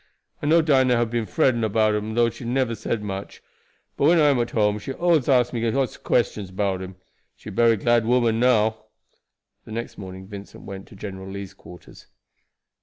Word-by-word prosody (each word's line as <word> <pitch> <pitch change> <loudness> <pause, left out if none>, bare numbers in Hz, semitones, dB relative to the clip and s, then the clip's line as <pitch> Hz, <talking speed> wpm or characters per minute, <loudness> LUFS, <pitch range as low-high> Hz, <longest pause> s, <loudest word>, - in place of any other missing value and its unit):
I - - -2
know 165 +2 +5
Dinah 130 -5 +3
hab 115 -1 0
been 115 -2 -1
fretting 130 -7 +1
about 110 0 +2
him 105 +1 -3
though 120 0 +3
she - - -11
never 125 0 0
said 110 0 -3
much, 100 -1 -6 0.6
but - - +1
when 170 +2 +5
I 150 -2 +5
am 135 - +1
at 120 - 0
home 105 -1 +1
she 135 - -6
allus 165 -4 +2
asks 125 -2 +3
me 115 -1 -2
all 115 - +1
sorts 135 0 -1
of - - -20
questions 105 -4 0
'bout 95 0 -1
him. 95 0 -8 0.4
She - - -10
bery 115 +1 +3
glad 120 +2 +2
woman 120 -2 +2
now." 110 -3 +2 0.8
The - - -13
next 115 +2 -6
morning 95 -1 -8
Vincent 100 0 -10
went 95 0 -9
to - - -15
General 95 -1 -8
Lee's 100 -1 -7
quarters. 90 - -15
115 Hz, 200 wpm, -23 LUFS, 100-125 Hz, 0.8 s, know